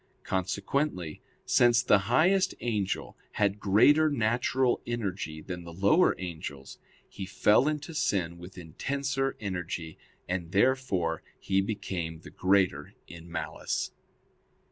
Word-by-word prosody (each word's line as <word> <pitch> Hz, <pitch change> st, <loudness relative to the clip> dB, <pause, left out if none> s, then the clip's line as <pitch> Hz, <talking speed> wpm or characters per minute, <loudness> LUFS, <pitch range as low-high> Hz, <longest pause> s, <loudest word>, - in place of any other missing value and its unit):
Consequently 95 Hz, -, -2 dB, 0.2 s
since 120 Hz, 0 st, +4 dB
the 105 Hz, -, +5 dB
highest 190 Hz, +3 st, +3 dB
angel 105 Hz, -5 st, -2 dB, 0.2 s
had 100 Hz, -1 st, +1 dB
greater 145 Hz, +11 st, +5 dB
natural 125 Hz, 0 st, +1 dB
energy 95 Hz, -9 st, -3 dB
than 90 Hz, -2 st, -6 dB
the 85 Hz, -, -9 dB
lower 100 Hz, -, +3 dB
angels, 80 Hz, -6 st, -7 dB, 0.3 s
he 95 Hz, -2 st, -7 dB
fell 105 Hz, +7 st, +4 dB
into 150 Hz, +1 st, -2 dB
sin 90 Hz, -, -1 dB
with 90 Hz, +2 st, -11 dB
intenser 135 Hz, -, -2 dB
energy, 90 Hz, -5 st, -5 dB, 0.3 s
and 90 Hz, -2 st, -3 dB
therefore 100 Hz, -8 st, +1 dB, 0.2 s
he 95 Hz, 0 st, +1 dB
became 95 Hz, -6 st, -4 dB
the -, -, -12 dB
greater 95 Hz, -6 st, +1 dB
in 85 Hz, 0 st, -12 dB
malice. 80 Hz, -2 st, -3 dB
100 Hz, 115 wpm, -29 LUFS, 85-125 Hz, 0.3 s, the